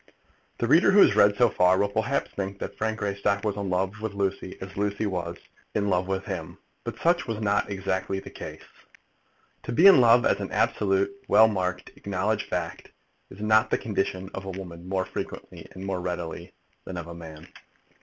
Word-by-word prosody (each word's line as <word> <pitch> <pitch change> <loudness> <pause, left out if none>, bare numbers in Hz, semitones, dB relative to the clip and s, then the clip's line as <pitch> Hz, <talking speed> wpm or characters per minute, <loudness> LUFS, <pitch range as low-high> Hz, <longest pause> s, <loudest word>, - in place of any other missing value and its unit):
The - - -1
reader, 160 +7 +5
who 200 +1 +7
has - - +6
read 100 0 +5
so 120 - +5
far, 90 -3 +3
will 100 - +2
perhaps 110 +7 -1
think 100 0 -4
that - - -6
Frank 110 0 -2
Greystock 100 -1 -1
was 105 -2 -1
in 100 -2 -3
love 95 +4 -1
with 110 -2 -4
Lucy 100 -1 -2
as 95 0 -8
Lucy 100 +1 -1
was 85 -3 -3 0.4
in 100 -1 +1
love 90 0 +1
with 95 0 -2
him. - - -5 0.3
But - - -5
such 170 -3 +1
was 115 -2 -3
not 105 -1 +1
exactly 95 -1 -2
the - - -11
case. - - -9 1.0
To - - -6
be 160 +10 +4
in 195 -9 +9
love, 120 +1 +6
as - - +2
an - - -5
absolute, 385 0 +1 0.2
well 110 - +7
marked, 90 -4 -2
acknowledged 100 +2 -2
fact, - - -4 0.4
is - - -12
the 110 +2 +3
condition 95 -3 -2
of 95 - -5
a - - -5
woman 90 -2 -8
more 95 -1 0
frequently - - -7
and 95 +1 -8
more 95 -2 -2
readily 90 -2 -5 0.3
than 90 - -7
of 85 - -5
a 85 - -8
man. 80 -1 -11
100 Hz, 195 wpm, -26 LUFS, 95-110 Hz, 1.0 s, in